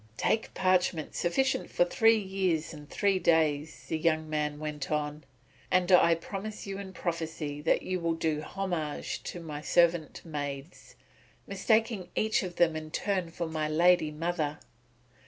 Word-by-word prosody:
"Take 220 Hz, -, 0 dB
parchment 180 Hz, -4 st, +1 dB
sufficient 260 Hz, +10 st, 0 dB
for -, -, +3 dB
three 225 Hz, -, +4 dB
years 190 Hz, -6 st, -1 dB
and 150 Hz, -2 st, -11 dB
three 200 Hz, -2 st, +1 dB
days," 155 Hz, -3 st, +1 dB
the 160 Hz, -, -2 dB
young 160 Hz, -1 st, +1 dB
man 150 Hz, -1 st, -1 dB
went 150 Hz, -2 st, -5 dB
on, 150 Hz, -1 st, -2 dB, 0.4 s
"and 185 Hz, 0 st, +2 dB
I 170 Hz, -2 st, +6 dB
promise 200 Hz, +5 st, -6 dB
you 195 Hz, 0 st, -5 dB
in 195 Hz, -1 st, -7 dB
prophecy 160 Hz, -4 st, -4 dB
that 160 Hz, -, +2 dB
you 185 Hz, 0 st, -2 dB
will 165 Hz, -1 st, 0 dB
do 160 Hz, -2 st, -1 dB
homage 170 Hz, -4 st, -3 dB
to 175 Hz, -, -5 dB
my 150 Hz, -3 st, -6 dB
servant 170 Hz, +1 st, +2 dB
maids, 145 Hz, 0 st, -6 dB, 0.5 s
mistaking 215 Hz, -1 st, +1 dB
each 220 Hz, 0 st, +2 dB
of 180 Hz, -2 st, -5 dB
them 165 Hz, -2 st, +3 dB
in 155 Hz, 0 st, -5 dB
turn 185 Hz, 0 st, -1 dB
for 170 Hz, +1 st, -4 dB
my 155 Hz, -1 st, -2 dB
lady 170 Hz, 0 st, +4 dB
mother." 155 Hz, -1 st, -2 dB
165 Hz, 155 wpm, -29 LUFS, 155-185 Hz, 0.5 s, I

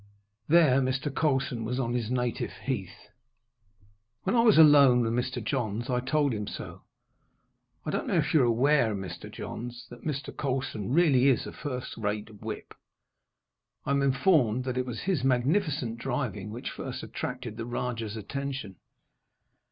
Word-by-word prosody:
There 150 Hz, -5 st, +5 dB
Mr. 130 Hz, +2 st, -1 dB
Colson 135 Hz, -6 st, 0 dB
was 125 Hz, +3 st, -2 dB
on 120 Hz, -2 st, -1 dB
his 120 Hz, -3 st, -1 dB
native 125 Hz, -2 st, -1 dB
heath. -, -, -5 dB, 1.1 s
When -, -, +1 dB
I 230 Hz, -, +5 dB
was 225 Hz, -6 st, +5 dB
alone 140 Hz, -5 st, +7 dB
with 115 Hz, -1 st, 0 dB
Mr. 125 Hz, +1 st, -2 dB
Johns 120 Hz, -2 st, -2 dB
I 125 Hz, -, +2 dB
told 140 Hz, +1 st, +1 dB
him 105 Hz, -2 st, -3 dB
so. -, -, -7 dB, 1.0 s
"I -, -, -2 dB
don't -, -, -2 dB
know -, -, 0 dB
if -, -, +1 dB
you 155 Hz, -, +6 dB
are -, -, +4 dB
aware, 120 Hz, -1 st, +3 dB
Mr. 95 Hz, -3 st, -7 dB
Johns, 120 Hz, +1 st, -7 dB
that 120 Hz, -1 st, -11 dB
Mr. 145 Hz, -2 st, -4 dB
Colson 130 Hz, -6 st, -2 dB
really 140 Hz, -4 st, +4 dB
is 130 Hz, -5 st, +3 dB
a -, -, -6 dB
first 130 Hz, -4 st, -5 dB
rate 105 Hz, -1 st, -4 dB
whip. 110 Hz, -1 st, -6 dB, 1.1 s
I -, -, -1 dB
am 140 Hz, 0 st, +2 dB
informed 135 Hz, -, +3 dB
that 130 Hz, -1 st, -3 dB
it 130 Hz, -, -2 dB
was 120 Hz, -2 st, -5 dB
his 180 Hz, -9 st, 0 dB
magnificent 135 Hz, -, +1 dB
driving 115 Hz, -6 st, -3 dB
which 115 Hz, +3 st, -5 dB
first -, -, -6 dB
attracted 125 Hz, -3 st, -5 dB
the 115 Hz, 0 st, -5 dB
Rajah's 115 Hz, -3 st, -3 dB
attention." 135 Hz, -3 st, -5 dB
125 Hz, 160 wpm, -28 LUFS, 115-140 Hz, 1.1 s, alone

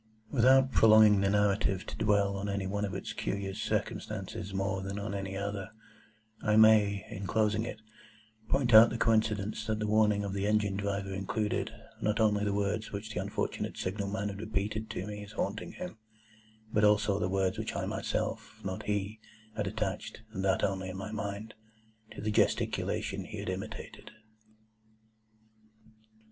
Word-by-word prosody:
Without 130 Hz, +1 st, +5 dB
prolonging 110 Hz, -3 st, +7 dB
the 100 Hz, -, +2 dB
narrative 100 Hz, -1 st, +2 dB
to -, -, -7 dB
dwell 100 Hz, -2 st, +2 dB
on 100 Hz, +1 st, -3 dB
any 100 Hz, -1 st, -2 dB
one 100 Hz, +2 st, -1 dB
of 100 Hz, -2 st, -4 dB
its 95 Hz, -, -5 dB
curious 100 Hz, -1 st, -3 dB
circumstances 100 Hz, -, -3 dB
more 95 Hz, 0 st, -1 dB
than 100 Hz, +1 st, -4 dB
on 100 Hz, 0 st, -4 dB
any 95 Hz, -1 st, -4 dB
other, 100 Hz, -1 st, -3 dB, 0.7 s
I 105 Hz, -1 st, +2 dB
may, 105 Hz, -2 st, +5 dB
in 95 Hz, 0 st, -5 dB
closing 110 Hz, +2 st, +1 dB
it, 110 Hz, -, -6 dB, 0.7 s
point 130 Hz, -4 st, +2 dB
out 110 Hz, +1 st, +10 dB
the 115 Hz, -, -3 dB
coincidence 110 Hz, -1 st, +1 dB
that 110 Hz, -1 st, 0 dB
the 105 Hz, -, -2 dB
warning 105 Hz, -1 st, +3 dB
of 100 Hz, -1 st, -3 dB
the 100 Hz, +1 st, -1 dB
Engine 105 Hz, -2 st, +2 dB
Driver 100 Hz, -1 st, -2 dB
included, 105 Hz, +2 st, -1 dB, 0.3 s
not 105 Hz, +1 st, +1 dB
only 105 Hz, -2 st, +3 dB
the 100 Hz, -, +1 dB
words 105 Hz, +2 st, -1 dB
which 105 Hz, +2 st, -5 dB
the 90 Hz, -, -1 dB
unfortunate 100 Hz, +1 st, -3 dB
Signal 100 Hz, +2 st, -2 dB
man 105 Hz, 0 st, -2 dB
had 100 Hz, 0 st, -7 dB
repeated 110 Hz, 0 st, -2 dB
to 95 Hz, -, -4 dB
me 105 Hz, 0 st, -6 dB
as 100 Hz, +1 st, -11 dB
haunting 105 Hz, 0 st, -3 dB
him, 180 Hz, -11 st, -7 dB, 0.7 s
but 105 Hz, -2 st, +3 dB
also 105 Hz, -1 st, +4 dB
the 90 Hz, -, 0 dB
words 95 Hz, -1 st, 0 dB
which -, -, -3 dB
I -, -, -1 dB
myself—not 95 Hz, 0 st, -3 dB
he—had 110 Hz, +1 st, -4 dB
attached, 110 Hz, +1 st, -4 dB
and 95 Hz, -, -3 dB
that 95 Hz, -1 st, +2 dB
only 95 Hz, -1 st, -1 dB
in 95 Hz, -, -6 dB
my 100 Hz, +2 st, -5 dB
own 110 Hz, -, -6 dB
mind, 100 Hz, +1 st, -4 dB, 0.6 s
to -, -, -8 dB
the 110 Hz, -, -1 dB
gesticulation -, -, 0 dB
he -, -, -8 dB
had -, -, -4 dB
imitated. -, -, -6 dB
105 Hz, 165 wpm, -31 LUFS, 100-110 Hz, 0.7 s, out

